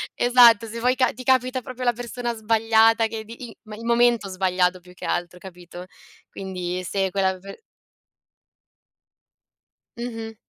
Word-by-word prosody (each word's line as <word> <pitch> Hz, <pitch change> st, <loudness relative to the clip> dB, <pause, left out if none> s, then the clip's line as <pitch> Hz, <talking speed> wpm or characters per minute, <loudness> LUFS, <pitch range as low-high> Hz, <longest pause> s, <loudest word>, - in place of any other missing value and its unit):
Esatto, 240 Hz, -3 st, +5 dB
se 230 Hz, +2 st, -7 dB
vuoi 250 Hz, +2 st, +2 dB
ca 255 Hz, -1 st, +1 dB
ti 255 Hz, +2 st, -10 dB
capita 255 Hz, 0 st, +1 dB
proprio 255 Hz, +1 st, -7 dB
la 240 Hz, -, +3 dB
persona 240 Hz, 0 st, -5 dB
sbagliata 225 Hz, +1 st, +3 dB
che 220 Hz, 0 st, -6 dB
di 235 Hz, +2 st, -10 dB
il 220 Hz, 0 st, -12 dB
momento 235 Hz, -3 st, +2 dB
sbagliato 185 Hz, -1 st, 0 dB
più 180 Hz, 0 st, -17 dB
che -, -, -9 dB
altro, 175 Hz, +1 st, -3 dB
capito? 180 Hz, -1 st, -11 dB, 0.5 s
Quindi 185 Hz, -1 st, -5 dB
se 190 Hz, 0 st, -2 dB
quella 190 Hz, -1 st, 0 dB
per 195 Hz, -, -11 dB, 2.4 s
Mh-mh. 225 Hz, -2 st, -6 dB
225 Hz, 135 wpm, -23 LUFS, 190-240 Hz, 2.4 s, Esatto